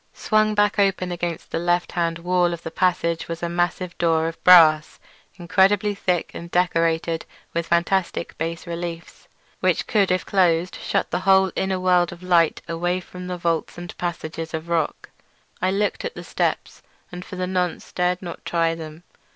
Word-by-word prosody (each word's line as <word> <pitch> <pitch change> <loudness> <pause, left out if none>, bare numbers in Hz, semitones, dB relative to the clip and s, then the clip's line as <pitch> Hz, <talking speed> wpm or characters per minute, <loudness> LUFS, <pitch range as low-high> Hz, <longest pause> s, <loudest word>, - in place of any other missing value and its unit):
Swung 215 -1 +1
back 205 0 +2
open 195 -2 +1
against 175 -1 -4
the - - -1
left 175 +1 0
hand 170 -1 -1
wall 175 0 +1
of 170 - -7
the 165 - -6
passage 170 -2 0
was 165 0 -6
a - - +1
massive 175 +1 -1
door 165 -1 +2
of 165 - -7
brass, 160 -4 +6 0.4
incredibly 190 +3 +2
thick 185 -4 -1
and 170 - -8
decorated 165 -2 +1 0.3
with 170 0 -2
fantastic 170 0 0
bas 165 +2 -3
reliefs, 170 -1 -7 0.3
which - - +1
could 205 -4 +2
if 185 0 0
closed 180 -2 +2
shut - - -1
the 180 - 0
whole 190 0 +4
inner 190 -1 -1
world 180 -1 +3
of 175 +1 -11
light 170 -3 +2
away 175 +2 -1
from 180 0 -9
the 180 0 -4
vaults 170 -1 -2
and 175 0 -8
passages 165 -2 -4
of 160 +1 -6
rock. 165 -2 -2 0.5
I 185 - +2
looked 200 +1 -1
at 480 - -5
the - - -8
steps, - - -2 0.3
and 180 0 -7
for 185 - -9
the 185 0 -2
nonce 180 -2 -2
dared 180 +1 0
not 175 - -7
try 165 -1 +1
them. 160 0 -9
175 Hz, 175 wpm, -23 LUFS, 165-185 Hz, 0.5 s, brass